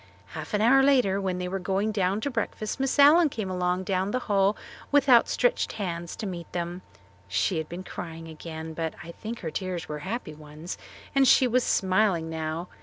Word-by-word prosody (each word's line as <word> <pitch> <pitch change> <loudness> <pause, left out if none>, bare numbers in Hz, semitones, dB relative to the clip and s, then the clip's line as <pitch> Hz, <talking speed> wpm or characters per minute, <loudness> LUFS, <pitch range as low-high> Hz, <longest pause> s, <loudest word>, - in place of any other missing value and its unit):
Half - - -5
an 210 - +1
hour 265 +5 +6
later 250 -8 +3
when 185 -2 -1
they 180 0 -3
were 195 +2 -3
going 195 +3 0
down 195 0 0
to 285 - -2
breakfast 225 0 -3
Miss 270 +1 0
Allen 300 +3 +7
came 215 -7 -4
along 180 0 0
the 195 +6 -1
hall 200 0 +2 0.3
with 285 0 +4
outstretched 270 - +3
hands 175 -5 -4
to - - -5
meet 175 -3 -6
them. 175 +1 -3 0.5
She 165 - 0
had 155 - -5
been 175 +2 -6
crying 165 -2 -7
again, 160 0 -7
but 160 0 -3
I 170 - -8
think 225 +6 -7
her 160 - -4
tears 180 -1 -4
were 150 0 -5
happy 190 -1 -5
ones; 155 +3 -8 0.4
and 275 -1 +4
she 260 - +6
was 250 +1 +2
smiling 185 -4 +1
now. 160 +2 -3
190 Hz, 190 wpm, -27 LUFS, 170-220 Hz, 0.5 s, Allen